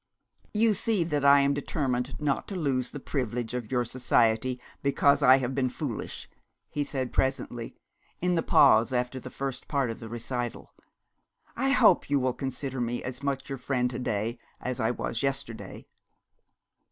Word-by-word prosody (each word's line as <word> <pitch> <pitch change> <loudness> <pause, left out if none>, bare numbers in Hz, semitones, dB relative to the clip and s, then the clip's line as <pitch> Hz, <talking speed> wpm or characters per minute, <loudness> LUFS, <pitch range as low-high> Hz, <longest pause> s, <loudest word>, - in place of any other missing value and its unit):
'You 220 +1 +3
see 205 -2 +1
that 150 -4 -1
I 140 0 +7
am 140 0 +3
determined 135 -3 -2
not 145 -2 -1
to 200 - -5
lose 135 -7 0
the 145 - -7
privilege 125 -4 -3
of 125 -2 -4
your 125 -2 +1
society, 120 0 +1 0.2
because 140 +1 +3
I 130 -1 +7
have 130 -1 -2
been 130 -1 +1
foolish!' 125 -3 -5 0.4
he 145 - -1
said 130 -3 -3
presently, 120 -3 -1 0.4
in 180 +1 +1
the 165 - +2
pause 110 -4 +5
after 125 +1 -1
the - - -8
first 135 -1 -5
part 140 -5 0
of 115 - -8
the 115 - -8
recital. 120 +1 -5 0.8
'I 270 +3 0
hope 220 - +5
you 140 -1 +3
will 130 -1 +1
consider 135 -1 -4
me 120 0 -2
as 125 +1 -5
much 140 -1 -2
your 135 -1 -5
friend 125 -1 0
to 120 - -4
day 115 0 -2 0.2
as 125 -1 -3
I 110 - +2
was 120 -1 -2
yesterday.' 135 -4 -4
130 Hz, 170 wpm, -28 LUFS, 120-140 Hz, 0.8 s, I